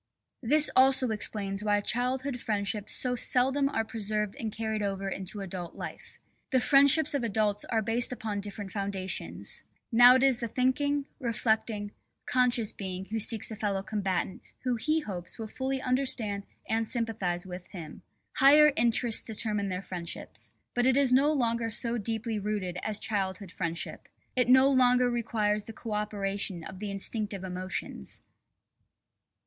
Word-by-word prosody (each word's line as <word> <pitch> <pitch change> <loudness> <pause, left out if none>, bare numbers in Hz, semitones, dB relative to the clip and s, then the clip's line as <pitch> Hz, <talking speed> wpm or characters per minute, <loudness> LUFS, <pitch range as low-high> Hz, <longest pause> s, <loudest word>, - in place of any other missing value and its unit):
This 295 +5 +6
also 260 -1 +5
explains 205 -2 -1
why 205 -1 +2
childhood 250 +4 -1
friendships 205 -1 -2
so 250 -1 0
seldom 265 +3 +2
are 225 -4 -1
preserved 210 -2 -2
and 220 -2 -3
carried 220 0 -3
over 195 -1 -2
into 195 +1 -4
adult 180 -3 -5
life. - - -9 0.3
The 260 - +3
friendships 280 +3 +5
of 280 -4 -1
adults 210 -2 0
are 225 -2 0
based 230 +3 0
upon 220 -4 -3
different 200 -1 -6
foundations. 195 -2 -2 0.3
Now 245 +2 +8
it 260 - +3
is 265 -3 +4
the 235 - -2
thinking, 275 +4 0
reflecting, 220 -4 -1 0.3
conscious 245 -3 +2
being 190 -1 -5
who 225 +3 -3
seeks 220 +1 0
a - - -4
fellow 200 -2 -2
combatant 195 -3 -2 0.2
who 250 -1 0
he 310 +7 0
hopes 185 - -4
will 225 -2 -5
fully 265 +3 -3
understand 250 -6 0 0.2
(and 225 0 0
sympathise 200 -8 0
with) 180 -1 -8
him. 165 -6 -9 0.4
Higher 295 +2 +7
interests 235 0 +3
determine 210 -3 -1
their 185 +1 -4
friendships. 175 -2 -6 0.2
But 245 +1 +2
it 260 0 +4
is 270 -3 +4
no 280 +4 +4
longer 235 -5 0
so 235 +1 0
deeply 220 +1 -2
rooted 200 -3 -3
as 215 -1 -2
childhood 195 -3 -3
friendship. 170 -2 -5 0.3
It 250 -2 +2
no 260 +1 +7
longer 250 -2 +4
requires 215 -3 0
the 225 - -8
co 225 +1 -8
operation 200 -4 -2
of 185 +2 -9
the 210 0 -4
instinctive 200 0 -3
emotions. 185 - -5
220 Hz, 155 wpm, -29 LUFS, 200-250 Hz, 0.4 s, Now